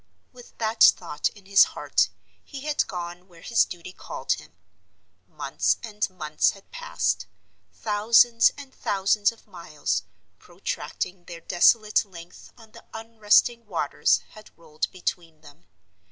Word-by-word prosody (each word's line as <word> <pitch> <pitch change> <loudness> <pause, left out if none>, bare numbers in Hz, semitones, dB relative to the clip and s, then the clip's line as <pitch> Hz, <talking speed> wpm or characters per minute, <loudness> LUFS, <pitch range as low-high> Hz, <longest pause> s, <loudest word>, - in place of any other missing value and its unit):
With 245 -1 -16
that 220 0 -3
thought 155 -4 +4
in 205 -3 -19
his 200 +1 +7
heart, - - +1 0.3
he 275 -2 -9
had 300 +1 0
gone 175 0 -7
where 170 -3 -18
his 230 - +3
duty 175 +1 -9
called - - -5
him. - - -3 0.7
Months - - -1
and 210 -2 -2
months 155 -5 0
had 195 - -10
passed; - - -2 0.4
thousands 230 +2 +4
and 275 -2 -11
thousands 205 +2 +1
of 230 - -20
miles, 170 -7 -3 0.4
protracting 180 -1 -5
their 170 -1 -9
desolate 210 +5 +3
length 175 -4 -13
on 225 -2 -17
the - - -15
unresting 225 +1 +2
waters 160 -6 +1
had 215 0 -14
rolled 155 -2 -4
between 170 -3 -5
them. 145 - -18
200 Hz, 135 wpm, -25 LUFS, 170-225 Hz, 0.7 s, his